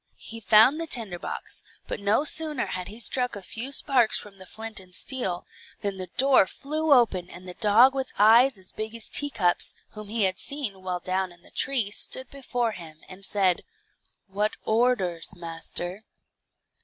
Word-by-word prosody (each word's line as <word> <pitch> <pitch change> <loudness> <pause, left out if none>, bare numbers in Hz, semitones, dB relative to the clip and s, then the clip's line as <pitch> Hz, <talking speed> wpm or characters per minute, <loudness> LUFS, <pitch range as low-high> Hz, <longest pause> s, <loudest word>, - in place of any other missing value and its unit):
He 230 - -9
found 225 +8 +5
the 330 - -3
tinder 220 - +3
box, - - -5 0.3
but - - -4
no 205 +7 +2
sooner 305 -3 +3
had 180 -1 -5
he 215 - -10
struck 250 +1 +1
a 200 - -8
few 230 +8 -5
sparks 265 -5 +3
from 200 -2 -10
the 185 -1 -13
flint 220 0 -3
and 185 -1 -14
steel, 190 -10 -3 0.4
than 200 -1 -3
the 185 -1 -6
door 265 -6 +5
flew 310 +6 -3
open 200 -9 +3
and 180 +1 -12
the 180 - -7
dog 225 +7 +5
with 265 -1 -4
eyes 230 +4 +5
as 190 -1 -11
big 220 +1 -6
as 230 - -7
teacups, 210 -12 +1
whom 215 -1 -10
he 220 +1 -1
had 190 -1 +1
seen 260 -10 -4
while 180 -1 -3
down 185 0 -2
in 175 0 -18
the - - -18
tree, 245 -7 +1
stood 260 +4 0
before 245 -4 -2
him, 160 -5 -11
and 190 +1 -12
said, 190 -2 +1 0.6
"What 205 +2 -2
orders, 220 -8 +1
master?" 175 +3 -6
215 Hz, 180 wpm, -25 LUFS, 185-250 Hz, 0.6 s, found